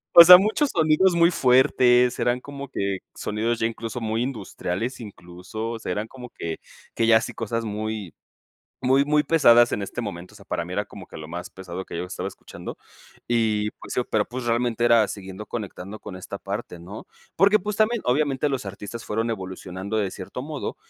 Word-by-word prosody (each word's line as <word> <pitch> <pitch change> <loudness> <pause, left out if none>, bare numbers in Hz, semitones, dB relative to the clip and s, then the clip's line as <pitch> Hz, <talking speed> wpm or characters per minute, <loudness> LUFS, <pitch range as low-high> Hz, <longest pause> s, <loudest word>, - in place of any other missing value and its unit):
o 170 - +13
sea, 180 +1 +12
muchos 215 +10 +1
sonidos 165 +2 +3
muy 170 +1 +5
fuertes, 125 -3 +4
eran 120 +1 +1
como 140 +1 -8
que 100 -6 -2 0.2
sonidos 110 +3 -1
ya - - +1
incluso 115 +1 -4
muy 110 0 -1
industriales, 115 -2 -3
incluso, 100 +1 -7
o 115 - -5
sea, 100 - -4
eran 105 +4 -2
como 125 0 -10
que 85 -6 -5 0.3
que 115 - +1
ya 110 -1 +7
sí - - -5
cosas 115 +1 -3
muy 105 -3 -4 0.7
muy, 135 +2 +4
muy 150 +1 +3
pesadas 120 -6 +5
en - - -1
este 100 +4 -4
momento, 90 -6 -6
o - - -14
sea, - - -15
para - - -2
mí - - -8
era - - -1
como - - -11
que - - -12
lo 75 0 -8
más 90 +2 -6
pesado 95 0 -7
que - - -7
yo 85 - -2
estaba 90 +1 -5
escuchando. 95 - -8 0.5
Y, 110 -3 +1
pues - - -10
sí, - - +1
pero, 110 -2 +2
pues, 125 +4 -6
realmente 120 0 0
era 115 -2 +5
siguiendo 95 +1 -8
conectando 100 -2 -6
con 95 - -8
esta 95 - -7
parte, 85 - -6
¿no? 95 +5 -9 0.3
Porque, 200 +4 +5
pues 205 +2 -3
también, 220 +1 +2
obviamente, 140 +2 +1
los 135 -6 -3
artistas 105 +4 -7
fueron 115 +2 -1
evolucionando 95 0 -4
de 100 -3 0
cierto 95 +7 -7
modo, 150 0 -5
115 Hz, 200 wpm, -24 LUFS, 100-130 Hz, 0.7 s, o